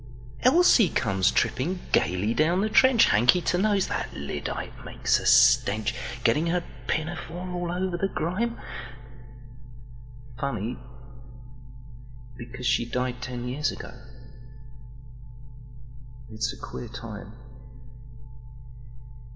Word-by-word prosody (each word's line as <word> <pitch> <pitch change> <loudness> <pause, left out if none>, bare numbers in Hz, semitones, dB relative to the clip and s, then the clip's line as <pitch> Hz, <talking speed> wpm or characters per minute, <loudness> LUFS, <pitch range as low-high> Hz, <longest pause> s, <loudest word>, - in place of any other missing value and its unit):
Elsie 255 - +5
comes 95 -7 +1
tripping 175 +8 0
gaily 90 +6 +1
down 170 +7 +2
the 215 - 0
trench, 260 -1 +6
Hanky 120 - +5
to 175 - 0
nose—that 205 -1 0
lyddite - - -5
makes - - 0
a - - -3
stench—Getting 120 +6 +3
her 175 +1 0 0.2
pinafore 175 +2 -3
all 175 -1 -3
over 180 +1 -1
grime. 195 +8 -2 1.8
Funny! 120 -4 -3 1.6
because 125 +1 -8
she 125 -1 +2
died 125 +1 -3
ten 125 -1 -5
years 140 +4 -1
ago! - - -9 2.4
It's 110 +2 -2
a - - -11
queer 120 - -7
time. 110 -2 -9
140 Hz, 95 wpm, -26 LUFS, 120-180 Hz, 2.4 s, trench